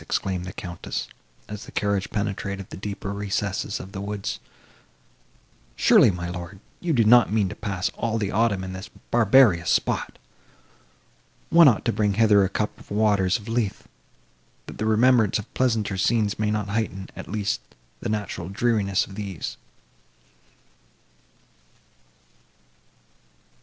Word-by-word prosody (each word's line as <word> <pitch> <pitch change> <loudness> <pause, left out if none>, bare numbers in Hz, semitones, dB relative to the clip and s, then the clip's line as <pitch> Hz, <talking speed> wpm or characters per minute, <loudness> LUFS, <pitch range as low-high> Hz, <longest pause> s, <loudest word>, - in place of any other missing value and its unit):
exclaimed 95 -2 -2
the 90 - -7
Countess, 85 -2 -5 0.4
as 105 0 -7
the - - -12
carriage 100 -1 -1
penetrated 100 -2 -3
the - - -6
deeper 100 0 -5
recesses 100 0 -2
of 95 - -9
the 95 - -6
woods. 100 -10 -4 1.4
"Surely, - - +6
my 85 -2 -3
lord, 90 +2 -7 0.2
you 175 - -2
do 120 -7 +4
not 120 +1 +6
mean 105 -2 +2
to - - -5
pass 100 -3 -2
all 115 -1 -1
the 105 -3 -2
autumn 105 -3 +1
in 95 0 -6
this 95 +2 -8 0.2
barbarous 115 -6 +5
spot! - - 0 1.3
One 165 -1 +8
ought 120 -6 +3
to 115 - +1
bring 105 -2 +1
hither 105 -2 +5
a 95 - 0
cup 105 +2 -3
of - - -16
the 100 - -5
waters 100 -4 +3
of 105 - -13
Lethe, 115 -3 -1 0.8
that - - -10
the 110 - 0
remembrance 110 -1 +4
of 105 - -8
pleasanter 110 -6 0
scenes 105 +1 +1
may 105 -1 +1
not 105 -1 -1
heighten, 100 -3 -3
at - - -9
least, 105 -1 -1 0.4
the - - -4
natural 105 -4 -3
dreariness 100 -2 +1
of 95 - -13
these." 100 -4 -5
105 Hz, 145 wpm, -24 LUFS, 95-110 Hz, 1.4 s, One